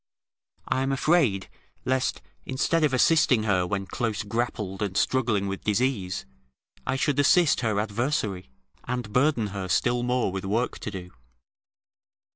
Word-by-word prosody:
I 130 Hz, -, 0 dB
am 135 Hz, +1 st, 0 dB
afraid, 135 Hz, -, +2 dB, 0.4 s
lest, 130 Hz, 0 st, 0 dB, 0.2 s
instead 155 Hz, +5 st, 0 dB
of 150 Hz, -, +3 dB
assisting 130 Hz, -3 st, +4 dB
her 95 Hz, -4 st, +1 dB
when 100 Hz, 0 st, -2 dB
close 110 Hz, 0 st, -2 dB
grappled 105 Hz, -3 st, -3 dB
and 100 Hz, -2 st, -2 dB
struggling 115 Hz, -6 st, +1 dB
with 95 Hz, 0 st, -5 dB
disease, 105 Hz, -, 0 dB, 0.6 s
I -, -, +1 dB
should 140 Hz, +1 st, 0 dB
assist 155 Hz, +1 st, +4 dB
her 110 Hz, -4 st, 0 dB
adversary, 105 Hz, -, -2 dB, 0.4 s
and 125 Hz, -4 st, -4 dB
burden 125 Hz, -5 st, +2 dB
her 95 Hz, -2 st, -4 dB
still 120 Hz, +7 st, +1 dB
more 125 Hz, -4 st, 0 dB
with 95 Hz, 0 st, -4 dB
work 110 Hz, +6 st, -1 dB
to -, -, -5 dB
do. 90 Hz, -3 st, -8 dB
115 Hz, 140 wpm, -26 LUFS, 100-130 Hz, 0.6 s, assisting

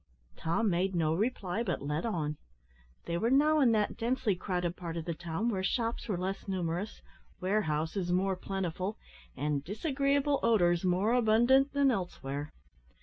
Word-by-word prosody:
Tom 170 Hz, +8 st, 0 dB
made 185 Hz, 0 st, +1 dB
no 160 Hz, -2 st, +2 dB
reply, 205 Hz, 0 st, -1 dB
but 180 Hz, -11 st, -2 dB
led 150 Hz, +8 st, -1 dB
on. 155 Hz, -8 st, -2 dB, 0.7 s
They 170 Hz, 0 st, -1 dB
were 230 Hz, -, +1 dB
now 300 Hz, +4 st, +4 dB
in 255 Hz, -5 st, +5 dB
that 210 Hz, -1 st, 0 dB
densely 230 Hz, -3 st, 0 dB
crowded 180 Hz, -1 st, -2 dB
part 170 Hz, -2 st, -5 dB
of 165 Hz, -, -4 dB
the 170 Hz, -, -2 dB
town 175 Hz, +7 st, -2 dB
where 195 Hz, -5 st, -1 dB
shops 230 Hz, +3 st, -1 dB
were 200 Hz, -5 st, -1 dB
less 190 Hz, +3 st, -4 dB
numerous, 185 Hz, +1 st, -3 dB, 0.4 s
warehouses 175 Hz, -2 st, 0 dB
more 190 Hz, +1 st, +2 dB
plentiful, 190 Hz, +1 st, -3 dB, 0.4 s
and 145 Hz, -1 st, -1 dB
disagreeable 275 Hz, -, +1 dB
odours 175 Hz, -7 st, +3 dB
more 185 Hz, +5 st, +2 dB
abundant, 245 Hz, +4 st, +4 dB
than 280 Hz, -2 st, +4 dB
elsewhere. 150 Hz, -, -4 dB
190 Hz, 150 wpm, -31 LUFS, 170-230 Hz, 0.7 s, in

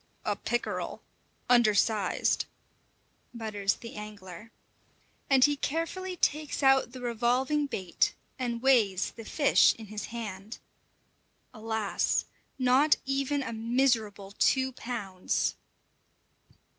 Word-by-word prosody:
"A -, -, 0 dB
pickerel! 240 Hz, 0 st, -3 dB, 0.4 s
undersized!" 215 Hz, -4 st, +3 dB, 0.9 s
mutters 210 Hz, -4 st, -1 dB
the 230 Hz, -, -10 dB
angler. 210 Hz, -1 st, -9 dB, 0.8 s
And 265 Hz, -2 st, +6 dB
he 290 Hz, 0 st, +2 dB
carefully 330 Hz, +6 st, -3 dB
takes 300 Hz, -2 st, 0 dB
out 270 Hz, -2 st, +4 dB
the 255 Hz, 0 st, -9 dB
revolving 250 Hz, +5 st, +1 dB
bait 185 Hz, -9 st, -1 dB, 0.2 s
and 240 Hz, -1 st, -3 dB
weighs 215 Hz, -8 st, +3 dB
the 225 Hz, -, -11 dB
fish 285 Hz, +4 st, +4 dB
in 225 Hz, -, -10 dB
his 215 Hz, 0 st, -5 dB
hand. 215 Hz, -2 st, -7 dB, 1.0 s
Alas! 220 Hz, -2 st, -1 dB, 0.3 s
not 265 Hz, +4 st, +4 dB
even 275 Hz, +1 st, 0 dB
a 230 Hz, -, -5 dB
miserable 225 Hz, -4 st, 0 dB
two 265 Hz, 0 st, +3 dB
pounds! 205 Hz, -7 st, -2 dB
235 Hz, 100 wpm, -29 LUFS, 215-270 Hz, 1.0 s, And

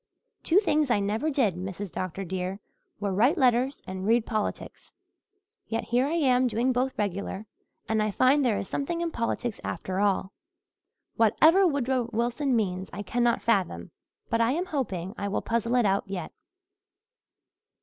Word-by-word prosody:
Two 335 Hz, -, +2 dB
things 305 Hz, -8 st, +1 dB
I 240 Hz, -, +3 dB
never 215 Hz, +9 st, -1 dB
did, 260 Hz, -, +2 dB
Mrs. 185 Hz, +1 st, -6 dB
Dr. 185 Hz, +1 st, -4 dB
dear, 185 Hz, +1 st, -4 dB, 0.4 s
were 200 Hz, -1 st, -1 dB
write 245 Hz, -, +3 dB
letters 255 Hz, 0 st, +2 dB
and 185 Hz, 0 st, -6 dB
read 230 Hz, 0 st, +3 dB
politics. 215 Hz, -3 st, -4 dB, 0.7 s
Yet 225 Hz, -, -2 dB
here 245 Hz, +3 st, +1 dB
I 305 Hz, -, -2 dB
am 255 Hz, -5 st, +3 dB
doing 240 Hz, +3 st, +1 dB
both 255 Hz, +2 st, -1 dB
regular 200 Hz, 0 st, -3 dB, 0.4 s
and 220 Hz, -1 st, +1 dB
I 215 Hz, -, +1 dB
find 260 Hz, +7 st, +3 dB
there 230 Hz, -5 st, +2 dB
is -, -, -4 dB
something 335 Hz, +5 st, -2 dB
in 340 Hz, -1 st, -1 dB
politics 230 Hz, -2 st, -3 dB
after 185 Hz, +2 st, -3 dB
all. 195 Hz, -1 st, +1 dB, 0.9 s
Whatever 320 Hz, -, +5 dB
Woodrow 260 Hz, -5 st, 0 dB
Wilson 240 Hz, +4 st, 0 dB
means 190 Hz, -4 st, -1 dB
I 205 Hz, -, -6 dB
cannot 240 Hz, +2 st, +1 dB
fathom 185 Hz, -, 0 dB, 0.4 s
but 230 Hz, 0 st, +1 dB
I 230 Hz, +3 st, +3 dB
am 350 Hz, +4 st, -1 dB
hoping 200 Hz, -, -3 dB
I 200 Hz, -, -2 dB
will 200 Hz, -, -2 dB
puzzle 235 Hz, +1 st, 0 dB
it 245 Hz, -3 st, +3 dB
out 195 Hz, 0 st, +1 dB
yet." 195 Hz, -2 st, -5 dB
230 Hz, 160 wpm, -27 LUFS, 195-260 Hz, 0.9 s, Whatever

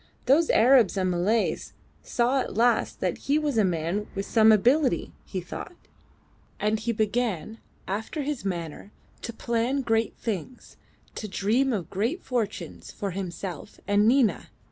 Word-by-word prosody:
Those 305 Hz, +5 st, +4 dB
Arabs 235 Hz, -4 st, +5 dB
and 185 Hz, -1 st, +1 dB
Malays 195 Hz, +6 st, 0 dB, 0.3 s
saw 250 Hz, +3 st, +1 dB
at 250 Hz, -, -4 dB
last 240 Hz, +1 st, +2 dB
that -, -, -1 dB
he 285 Hz, +2 st, +1 dB
was 300 Hz, -3 st, -1 dB
a -, -, +5 dB
man 180 Hz, +3 st, -1 dB
of 195 Hz, 0 st, -2 dB
some 220 Hz, -1 st, +5 dB
ability, 245 Hz, -, +3 dB
he 185 Hz, -, -4 dB
thought. 180 Hz, -, -8 dB, 0.8 s
And 215 Hz, +1 st, +1 dB
he 235 Hz, +2 st, -1 dB
began, 220 Hz, -1 st, -1 dB, 0.3 s
after 220 Hz, -, -3 dB
his 285 Hz, -6 st, -3 dB
manner, 175 Hz, 0 st, -5 dB, 0.3 s
to 235 Hz, -, -5 dB
plan 235 Hz, +4 st, -1 dB
great 225 Hz, -2 st, 0 dB
things, 225 Hz, +3 st, -5 dB, 0.4 s
to 215 Hz, -, -5 dB
dream 225 Hz, +7 st, +1 dB
of 200 Hz, -8 st, -3 dB
great 235 Hz, -, -1 dB
fortunes 205 Hz, -, -3 dB
for 200 Hz, -1 st, -4 dB
himself 185 Hz, 0 st, -6 dB
and 205 Hz, +1 st, +3 dB
Nina. 245 Hz, -2 st, +2 dB
220 Hz, 145 wpm, -26 LUFS, 195-245 Hz, 0.8 s, Arabs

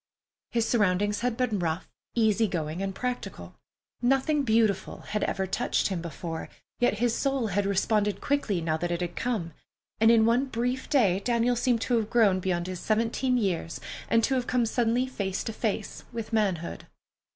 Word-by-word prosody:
His 230 Hz, -2 st, 0 dB
surroundings 205 Hz, -2 st, +2 dB
had 245 Hz, -1 st, -1 dB
been 240 Hz, -5 st, 0 dB
rough, 165 Hz, 0 st, -2 dB, 0.3 s
easy 220 Hz, -1 st, +3 dB
going, 165 Hz, -1 st, -3 dB
and 195 Hz, -1 st, -3 dB
practical. 250 Hz, -1 st, -4 dB, 0.5 s
Nothing 270 Hz, +4 st, +2 dB
beautiful 220 Hz, -6 st, +1 dB
had 210 Hz, -1 st, -3 dB
ever 190 Hz, -, -1 dB
touched 210 Hz, +4 st, 0 dB
him 185 Hz, -4 st, -2 dB
before, 165 Hz, 0 st, -5 dB, 0.3 s
yet 245 Hz, -3 st, +3 dB
his 235 Hz, +1 st, +1 dB
soul 270 Hz, -3 st, 0 dB
had 200 Hz, +1 st, 0 dB
responded 205 Hz, +1 st, +1 dB
quickly 260 Hz, -11 st, 0 dB
now 160 Hz, -1 st, 0 dB
that 175 Hz, +2 st, -2 dB
it 175 Hz, 0 st, -2 dB
had 175 Hz, -1 st, -3 dB
come, 210 Hz, -10 st, -2 dB, 0.5 s
and 225 Hz, +1 st, +6 dB
in 230 Hz, -1 st, +6 dB
one 240 Hz, +4 st, +3 dB
brief 250 Hz, +1 st, -2 dB
day 215 Hz, -, +3 dB
Daniel 240 Hz, +1 st, +2 dB
seemed 240 Hz, -1 st, +1 dB
to 245 Hz, 0 st, +1 dB
have 220 Hz, -2 st, -1 dB
grown 210 Hz, -6 st, +4 dB
beyond 175 Hz, -2 st, -1 dB
his 185 Hz, -1 st, -5 dB
seventeen 230 Hz, +5 st, +1 dB
years 180 Hz, -7 st, -1 dB, 0.3 s
and 230 Hz, 0 st, +3 dB
to 270 Hz, -, +2 dB
have 250 Hz, -2 st, 0 dB
come 245 Hz, -2 st, +2 dB
suddenly 240 Hz, +2 st, +1 dB
face 200 Hz, -7 st, -3 dB
to 225 Hz, -, -4 dB
face 220 Hz, -2 st, -3 dB
with 230 Hz, -1 st, -6 dB
manhood. 190 Hz, -6 st, -1 dB
220 Hz, 175 wpm, -27 LUFS, 190-245 Hz, 0.5 s, and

